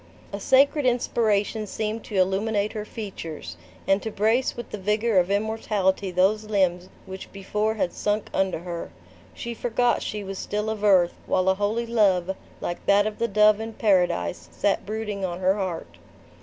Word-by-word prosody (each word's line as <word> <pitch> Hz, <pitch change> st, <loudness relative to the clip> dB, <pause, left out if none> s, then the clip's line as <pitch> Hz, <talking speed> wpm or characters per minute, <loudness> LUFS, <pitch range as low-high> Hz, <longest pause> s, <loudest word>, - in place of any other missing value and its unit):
A 200 Hz, -, -3 dB
sacred 275 Hz, +4 st, +4 dB
inspiration 220 Hz, -3 st, +1 dB
seemed 215 Hz, +2 st, -3 dB
to 210 Hz, -, -7 dB
illuminate 200 Hz, +3 st, +1 dB
her 210 Hz, -1 st, -4 dB
features, 190 Hz, -, -7 dB, 0.3 s
and 195 Hz, +1 st, +3 dB
to 220 Hz, -, -3 dB
brace 220 Hz, +6 st, +1 dB
with 240 Hz, -, -7 dB
the 210 Hz, -, -5 dB
vigor 210 Hz, +1 st, +2 dB
of 180 Hz, +1 st, +1 dB
immortality 205 Hz, -2 st, 0 dB
those 195 Hz, +4 st, +2 dB
limbs 185 Hz, -4 st, 0 dB, 0.2 s
which 190 Hz, 0 st, -9 dB
before 210 Hz, +3 st, -1 dB
had 190 Hz, -5 st, -1 dB
sunk 210 Hz, 0 st, -1 dB
under 190 Hz, -1 st, +1 dB
her. 170 Hz, -, -5 dB, 0.5 s
She 235 Hz, -, -5 dB
forgot 240 Hz, +1 st, +1 dB
she 210 Hz, -1 st, -4 dB
was 195 Hz, -1 st, -6 dB
still 210 Hz, +1 st, -2 dB
of 215 Hz, -1 st, -5 dB
earth, 185 Hz, -4 st, +5 dB
while 185 Hz, 0 st, +2 dB
a -, -, +5 dB
holy 205 Hz, +4 st, -1 dB
love, 190 Hz, -5 st, +2 dB, 0.3 s
like 175 Hz, -, -4 dB
that 205 Hz, +1 st, +5 dB
of 215 Hz, -1 st, -4 dB
the 235 Hz, -, +1 dB
dove 210 Hz, 0 st, +4 dB
in 225 Hz, 0 st, -5 dB
Paradise, 90 Hz, -, +1 dB
sat 195 Hz, -, 0 dB
brooding 210 Hz, -2 st, -3 dB
on 175 Hz, -1 st, -3 dB
her 185 Hz, +1 st, +3 dB
heart. 170 Hz, -, -5 dB
205 Hz, 170 wpm, -25 LUFS, 190-220 Hz, 0.5 s, earth